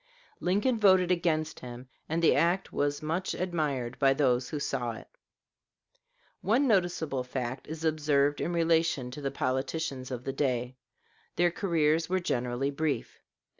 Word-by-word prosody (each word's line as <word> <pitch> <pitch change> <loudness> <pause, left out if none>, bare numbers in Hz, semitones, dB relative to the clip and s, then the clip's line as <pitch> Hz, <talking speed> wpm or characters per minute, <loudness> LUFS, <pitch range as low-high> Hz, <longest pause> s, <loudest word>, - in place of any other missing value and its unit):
Lincoln 210 +7 +1
voted 185 -3 +5
against 160 -3 0
him, 125 0 -9 0.2
and 165 +2 -1
the - - +5
act 175 +3 +1
was 145 +1 -1
much 165 +5 -2
admired 150 -9 -2
by 135 -1 +4
those 125 -3 +2
who 150 - -3
saw 125 -4 -2
it. 110 - -11 1.3
One 240 +9 +2
noticeable 175 - +1
fact 125 0 -4
is 160 +1 -5
observed 145 -2 +2
in 175 - -1
relation 165 -6 +1
to 145 - -7
the 140 - -1
politicians 135 0 -2
of 125 -2 -5
the 135 - -3
day 125 -3 -1 0.6
their 175 0 +3
careers 165 -4 +1
were 185 0 +2
generally 125 -3 -1
brief. 150 +1 -2
150 Hz, 145 wpm, -29 LUFS, 130-170 Hz, 1.3 s, voted